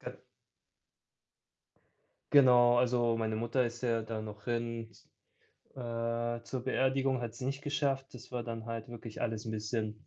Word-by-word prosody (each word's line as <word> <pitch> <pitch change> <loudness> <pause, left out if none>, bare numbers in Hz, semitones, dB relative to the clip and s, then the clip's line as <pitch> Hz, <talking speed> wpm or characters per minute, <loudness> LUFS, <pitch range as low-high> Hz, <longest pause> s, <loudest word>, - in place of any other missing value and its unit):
G - - -5 2.3
Genau, 125 -3 +7
also, 120 -2 +3
meine 110 -1 -1
Mutter 120 +3 +1
ist 120 +1 -4
ja 115 -2 +2
da 110 0 -4
noch 105 -1 -8
hin 115 -1 -2
z - - -21 0.7
äh, 115 -1 -2
zur 130 0 -4
Beerdigung 130 -1 +1
hat 115 -2 -4
sie 130 - -5
nicht 140 +1 -2
geschafft, 140 -2 0
das 125 - -11
war 125 -2 -3
dann 115 -1 -5
halt 115 -1 -4
wirklich 115 -2 -7
alles 115 -1 -2
'n - - -2
bisschen, 110 +1 -3
120 Hz, 155 wpm, -32 LUFS, 115-125 Hz, 2.3 s, Genau